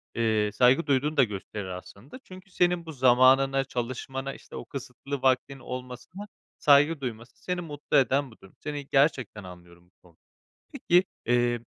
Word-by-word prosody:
eee, 110 -2 +1
saygı 130 +7 +4
duyduğunu 145 +3 +1
da 135 - +7
gösterir 105 -1 -5
aslında. 95 - -10
Çünkü 185 +1 -14
senin 175 -1 +1
bu 160 - -7
zamanına, 135 +1 +4
çalışmana, 130 +2 -5
işte, - - -13
o - - -7
kısıtlı 140 +1 -7
vaktin 135 +1 +1
olmasına 125 +11 -8 0.3
saygı 145 +1 +4
duyması, 120 -1 -7
seni 180 -1 -2
mutlu 145 -3 -2
eden 135 -1 +2
bu - - -16
durum. 95 - -16
Seni 145 -2 -6
gerçekten 135 -7 +1
anlıyorum 90 -1 -14
bu - - -48 0.2
konu 85 - -24 0.6
Peki, 180 +2 +3 0.2
eee, 120 -1 +2
130 Hz, 155 wpm, -27 LUFS, 120-145 Hz, 0.6 s, da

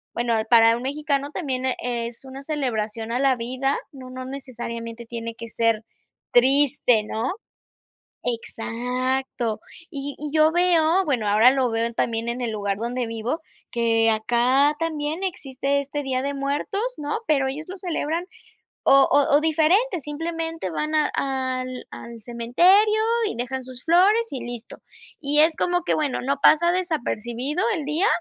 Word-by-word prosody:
bueno, 235 -1 0
para 230 -1 +6
un 240 - -7
mexicano 285 +1 -1
también 260 -7 -3
es 235 0 -4
una 265 +1 -9
celebración 230 -7 -3
a 245 - 0
la 270 -1 +3
vida, 260 +4 -1
¿no?, 260 -2 -11
no 255 0 -7
necesariamente 235 -3 -7
tiene 230 -1 -5
que 230 -1 -9
ser 230 -1 +1 0.5
triste, 255 -3 +4
¿no? 225 +6 -2 0.9
Exacto, 245 0 -2 0.3
y 280 -2 -5
y 300 0 -5
yo 310 0 +4
veo, 350 0 +3
bueno, 255 - 0
ahora 220 +5 +6
lo 260 -2 +1
veo 230 +1 -1
también 230 0 -1
en 240 +2 -2
el 235 -2 -2
lugar 200 -2 -2
donde 240 +2 -2
vivo, 230 +6 -3 0.3
que 225 -1 +2
acá 250 +6 +2
también 320 +2 -2
existe 280 -5 -1
este 285 +1 -4
Día 260 -1 -1
de 280 +1 -2
Muertos, 285 +9 -2
¿no?, 300 +9 -3
pero 275 -5 +2
ellos 300 +4 -5
lo 375 - -7
celebran 340 -2 -2 0.6
o 275 0 +6
o 285 0 +4
o - - +4
diferente, 330 +6 +2
simplemente 325 - -4
van 305 - -2
a 305 -1 +2
al 255 -2 -2
al 235 -1 -9
cementerio 350 - +3 0.3
y - - -4
dejan 255 +1 -3
sus 255 -1 -11
flores, 395 +7 +4
y 265 - -5
listo. 240 -1 -8 0.4
Y 295 0 +3
es 315 0 +4
como 355 0 +1
que 350 - 0
bueno, 295 -4 -1
no 275 +2 0
pasa 340 +2 +6
desapercibido 295 - -2
el 310 -5 -3
día, 310 +7 +1
265 Hz, 155 wpm, -23 LUFS, 235-310 Hz, 0.9 s, para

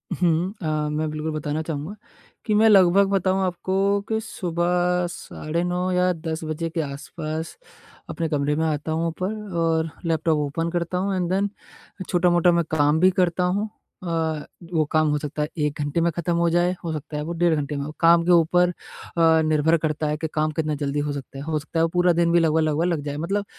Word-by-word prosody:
हुँ। 175 +2 +1
अ, 165 - -4 0.2
मैं 155 +1 -1
बिल्कुल 155 +1 -3
बताना 150 0 -2
चाहूँगा 160 +4 -5 0.5
कि 215 - +1
मैं 220 +1 +5
लगभग 195 -1 +6
बताऊँ 190 -1 +1
आपको 185 +1 -2 0.3
कि 220 - +1
सुबह 180 -2 0
साढ़े 170 0 -4
9 180 +1 -1
या 180 0 +2
10 160 -1 -5
बजे 155 +1 -3
के 165 0 -2
आस-पास 155 +3 -6 0.5
अपने 165 -1 -2
कमरे 150 -1 0
में 160 - 0
आता 155 0 -2
हूँ 165 +1 0
ऊपर 185 +6 -3 0.2
और 165 -1 +1 0.2
लैपटॉप 160 -1 +1
ओपन 150 +3 -2
करता 175 +1 -2
हूँ 195 +1 -1
एंड 180 -1 -1
देन 200 +2 +1 0.6
छोटा-मोटा 175 -1 +3
मैं 170 0 +2
काम 150 +1 +3
भी 185 +2 +5
करता 180 -1 +1
हूँ। 200 +4 0 0.3
अ, - - -7 0.7
वो 160 - +3
काम 155 0 +3
हो 150 - +1
सकता 150 0 -4
है 150 - 0
1 150 0 -1
घंटे 145 +3 0
में 170 - +2
ख़त्म 170 0 -1
हो 170 0 +2
जाए 175 +2 +2
हो 165 - -3
सकता 150 0 -5
है 150 - -2
वो 170 - -4
डेढ़ 175 -2 +3
घंटे 145 0 -3
में 140 - -3
हो। 150 - -6
काम 170 0 +5
के 180 - +3
ऊपर 175 +1 +4
अ, 165 -2 0
निर्भर 155 +1 +3
करता 155 -1 -2
है 150 0 -1
कि 160 - -3
काम 155 0 +1
कितना 155 -1 -1
जल्दी 145 0 -2
हो - - -1
सकता 135 -1 -8
है। 140 - -6
हो 155 0 -1
सकता 160 +3 -4
है - - +4
वो 165 - +2
पूरा 175 0 +4
दिन 170 0 +3
भी 170 - +5
लगभग-लगभग 160 -1 +2
लग 170 -4 0
जाए 145 0 -4
मतलब 195 +6 -1
165 Hz, 215 wpm, -23 LUFS, 155-180 Hz, 0.7 s, लगभग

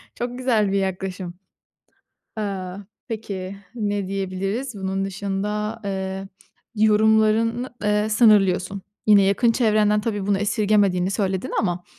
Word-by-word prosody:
Çok 245 +1 -4
güzel 225 -6 +1
bir 200 - +1
yaklaşım. 190 -1 -3 1.1
Eee, 195 -3 -3 0.4
peki 200 -4 -5 0.2
ne 205 -4 -2
diyebiliriz 195 +6 -3
bunun 195 -1 -2
dışında, 205 +3 -3
eee, 190 0 -4 0.5
yorumlarını, 220 +2 +3
eee, 210 0 +1
sınırlıyorsun. 200 -4 +3 0.2
Yine 205 -2 +7
yakın 200 +5 +3
çevrenden 215 -3 +3
tabii 205 -3 -3
bunu 200 -1 +2
esirgemediğini 200 -3 +2
söyledin 195 +2 -1
ama. 175 -3 -2
205 Hz, 110 wpm, -23 LUFS, 195-215 Hz, 1.1 s, Yine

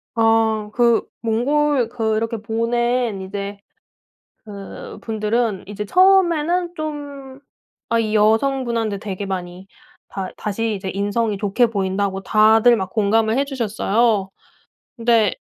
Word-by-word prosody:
아. 225 -2 +2
그 235 -2 +3 0.2
몽골 255 +3 +1
그 225 -2 -1
이렇게 225 0 -3
보낸 235 -1 -1
이제 200 +1 -6 0.9
그분들은 215 +1 -3
이제 205 +1 -5
처음에는 355 - +3
좀 285 -3 -7 0.5
아 230 0 +2
이 215 -1 0
여성분한테 225 -1 +1
되게 200 -1 -5
많이 185 0 -6 0.4
다 190 -2 -5
다시 220 +1 -2
이제 190 -1 -5
인성이 205 +2 -1
좋게 210 +4 +2
보인다고 195 -2 -2
다들 220 +2 +5
막 190 -3 -4
공감을 220 +2 +1
해주셨어요. 230 -5 0 0.7
근데 230 -4 +2
225 Hz, 235 characters per minute, -20 LUFS, 205-245 Hz, 0.9 s, 다들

